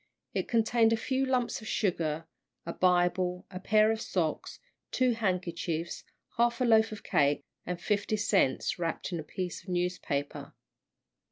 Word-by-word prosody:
It -, -, -1 dB
contained 225 Hz, 0 st, +3 dB
a 230 Hz, -, +3 dB
few 265 Hz, +3 st, 0 dB
lumps 250 Hz, -3 st, 0 dB
of 220 Hz, -, -9 dB
sugar, 165 Hz, -7 st, -1 dB, 0.4 s
a 170 Hz, -, -4 dB
Bible, 180 Hz, 0 st, +2 dB
a 185 Hz, -, -6 dB
pair 215 Hz, +2 st, +4 dB
of 225 Hz, 0 st, -2 dB
socks, 165 Hz, -8 st, -2 dB, 0.3 s
two 255 Hz, -1 st, +2 dB
handkerchiefs, 175 Hz, -6 st, -2 dB, 0.3 s
half 235 Hz, +1 st, +2 dB
a 255 Hz, -, +2 dB
loaf 225 Hz, -1 st, +4 dB
of 215 Hz, -, -8 dB
cake, 145 Hz, 0 st, +2 dB, 0.2 s
and 180 Hz, -1 st, -3 dB
fifty 210 Hz, +2 st, 0 dB
cents 200 Hz, -9 st, +1 dB
wrapped 170 Hz, +2 st, -2 dB
in 170 Hz, -, -2 dB
a -, -, -5 dB
piece 180 Hz, +3 st, -5 dB
of -, -, -13 dB
newspaper. 175 Hz, -5 st, -2 dB
185 Hz, 155 wpm, -30 LUFS, 170-225 Hz, 0.4 s, pair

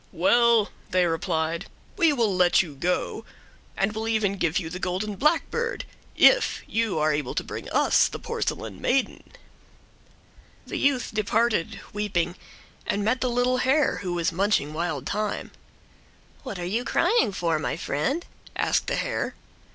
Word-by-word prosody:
"Well," 235 Hz, -5 st, +4 dB, 0.2 s
they 180 Hz, -1 st, +3 dB
replied, 165 Hz, -1 st, -1 dB, 0.3 s
"we 335 Hz, -5 st, +4 dB
will 230 Hz, -8 st, +1 dB
let 180 Hz, 0 st, +4 dB
you 160 Hz, -5 st, -9 dB
go, 175 Hz, +6 st, -2 dB, 0.5 s
and 195 Hz, +2 st, +1 dB
will 220 Hz, +1 st, -3 dB
even 215 Hz, -3 st, +1 dB
give 165 Hz, 0 st, +1 dB
you 175 Hz, -, -2 dB
the 180 Hz, +3 st, -6 dB
golden 185 Hz, +3 st, -2 dB
blackbird 340 Hz, -, 0 dB, 0.3 s
if -, -, +5 dB
you 225 Hz, -6 st, -1 dB
are 155 Hz, 0 st, +2 dB
able 145 Hz, -3 st, -2 dB
to -, -, 0 dB
bring -, -, -7 dB
us -, -, +4 dB
the -, -, -6 dB
porcelain 105 Hz, -4 st, -4 dB
maiden." 270 Hz, +1 st, 0 dB, 1.4 s
The -, -, -4 dB
youth 275 Hz, -3 st, +1 dB
departed, 215 Hz, -3 st, 0 dB
weeping, 195 Hz, -5 st, -1 dB, 0.5 s
and 205 Hz, 0 st, 0 dB
met 240 Hz, +4 st, +1 dB
the 255 Hz, -, +1 dB
little 245 Hz, +1 st, +1 dB
hare, 270 Hz, +4 st, +2 dB
who 180 Hz, -2 st, -4 dB
was 170 Hz, -1 st, 0 dB
munching 180 Hz, -4 st, +1 dB
wild 170 Hz, +1 st, -3 dB
thyme. 210 Hz, 0 st, -2 dB, 0.9 s
"What 250 Hz, -8 st, -6 dB
are 175 Hz, -, -4 dB
you 220 Hz, +7 st, -1 dB
crying 345 Hz, -, +2 dB
for, 170 Hz, -4 st, 0 dB
my -, -, -2 dB
friend?" 270 Hz, -, -1 dB, 0.3 s
asked -, -, +1 dB
the -, -, 0 dB
hare. -, -, -2 dB
205 Hz, 150 wpm, -25 LUFS, 175-240 Hz, 1.4 s, if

